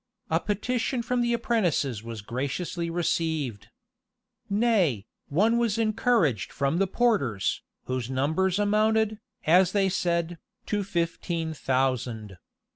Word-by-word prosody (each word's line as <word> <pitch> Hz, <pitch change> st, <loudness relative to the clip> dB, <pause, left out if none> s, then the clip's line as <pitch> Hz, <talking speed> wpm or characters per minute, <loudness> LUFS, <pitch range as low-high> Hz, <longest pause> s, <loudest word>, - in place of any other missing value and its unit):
A -, -, +3 dB
petition 235 Hz, +4 st, -1 dB
from 250 Hz, +1 st, 0 dB
the 240 Hz, 0 st, +1 dB
apprentices 185 Hz, -, 0 dB
was 115 Hz, -2 st, -7 dB
graciously 150 Hz, +8 st, -3 dB
received.[] 160 Hz, -, -1 dB, 0.8 s
Nay, 200 Hz, -, +2 dB, 0.2 s
one 220 Hz, +10 st, +3 dB
was 230 Hz, -2 st, +1 dB
encouraged 215 Hz, -, +1 dB
from 140 Hz, +3 st, 0 dB
the 195 Hz, -, +2 dB
porters, 180 Hz, -, +1 dB, 0.2 s
whose 130 Hz, -2 st, -3 dB
numbers 160 Hz, +8 st, +1 dB
amounted, 215 Hz, +1 st, +2 dB, 0.3 s
as 180 Hz, +3 st, +5 dB
they 195 Hz, -2 st, +3 dB
said, 170 Hz, -2 st, -1 dB, 0.3 s
to 205 Hz, -1 st, -1 dB
fifteen 170 Hz, -2 st, -2 dB
thousand. 125 Hz, -, -1 dB
175 Hz, 115 wpm, -27 LUFS, 135-215 Hz, 0.8 s, as